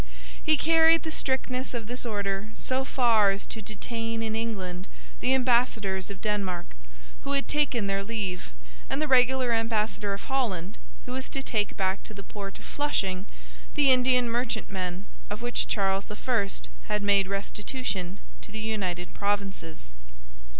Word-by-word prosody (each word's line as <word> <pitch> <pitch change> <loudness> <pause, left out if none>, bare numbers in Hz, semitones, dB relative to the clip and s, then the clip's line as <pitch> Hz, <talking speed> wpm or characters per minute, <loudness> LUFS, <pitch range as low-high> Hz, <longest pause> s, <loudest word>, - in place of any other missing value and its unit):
He 310 -1 +5
carried 325 +1 +6
the 315 - -3
strictness 260 -3 -1
of 230 -2 -3
this 245 +2 -3
order 200 -1 -1
so 260 +1 0
far 230 -6 +4
as 195 +1 -1
to 220 - -5
detain 225 +2 -3
in 220 -1 -1
England 195 -5 -3 0.3
the 260 +1 +3
ambassadors 235 -7 +2
of 200 - -7
Denmark, 195 -5 -1 0.5
who 280 - -1
had 275 0 +2
taken 275 -7 +2
their 195 0 0
leave, 200 -4 -3 0.4
and - - 0
the 310 - +1
regular 255 -1 +4
ambassador 220 -2 +1
of 200 - -9
Holland, 215 -9 -1 0.3
who 250 - -6
was 260 +1 -4
to 270 - -2
take 210 -5 0
back 190 0 +1
to 215 - -8
the 200 - -7
port 200 -1 -7
of - - -13
Flushing 195 -10 -1 0.5
the 285 -3 +6
Indian 250 -1 +5
merchantmen 205 -6 -2 0.2
of 210 +3 -5
which 240 0 0
Charles 195 -1 +1
I. 210 -1 0 0.4
had 210 -1 0
made 200 -1 +4
restitution 200 -1 -2 0.2
to - - -10
the 215 - -4
United 190 -5 -2
Provinces. 195 - -2
215 Hz, 155 wpm, -28 LUFS, 195-250 Hz, 0.5 s, carried